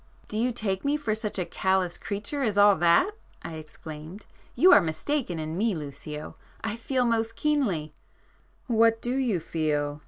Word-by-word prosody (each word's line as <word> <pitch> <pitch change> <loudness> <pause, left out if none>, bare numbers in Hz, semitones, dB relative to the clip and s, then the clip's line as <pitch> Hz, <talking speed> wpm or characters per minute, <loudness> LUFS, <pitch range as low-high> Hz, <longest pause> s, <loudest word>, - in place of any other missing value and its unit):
"Do - - -6
you 240 +3 +1
take 205 -5 -2
me 285 +1 +1
for 230 -8 -1
such 215 -1 -3
a 180 - -1
callous 190 -2 0
creature 210 +8 -4
as 215 -6 0
all 205 0 +7
that?" 175 - +4 0.3
I 165 - -6
exclaimed—"You 155 - -2
are - - +8
mistaken 175 - -2
in 155 0 -4
me, 210 +2 +1
Lucio. 150 0 -7 0.3
I 220 -1 -2
feel 250 +2 0
most 225 -1 0
keenly——" 215 - 0 0.7
"What 230 -1 +3
do 245 +2 -2
you 245 -9 +1
feel?" 150 -2 -1
205 Hz, 160 wpm, -27 LUFS, 160-235 Hz, 0.7 s, are